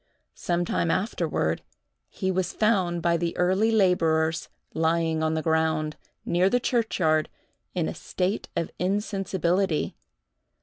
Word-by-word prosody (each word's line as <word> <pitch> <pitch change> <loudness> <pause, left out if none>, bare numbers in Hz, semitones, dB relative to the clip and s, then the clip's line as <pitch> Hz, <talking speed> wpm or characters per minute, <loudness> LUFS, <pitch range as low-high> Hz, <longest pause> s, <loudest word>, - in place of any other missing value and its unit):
Sometime 175 -1 -1
afterward, 185 +6 0 0.5
he 190 -2 -2
was 185 -1 -1
found 185 -6 +1
by 170 0 +3
the 170 0 -2
early 190 +5 +3
laborers 165 -6 +2 0.2
lying 160 0 +1
on 160 0 +1
the 160 - -1
ground, 160 -1 +1 0.3
near 180 +2 +3
the 245 - +2
churchyard, 185 -11 +1 0.5
in 175 -3 0
a - - -3
state 185 +3 -2
of 165 - -1
insensibility. 190 -3 0
175 Hz, 120 wpm, -26 LUFS, 160-190 Hz, 0.5 s, by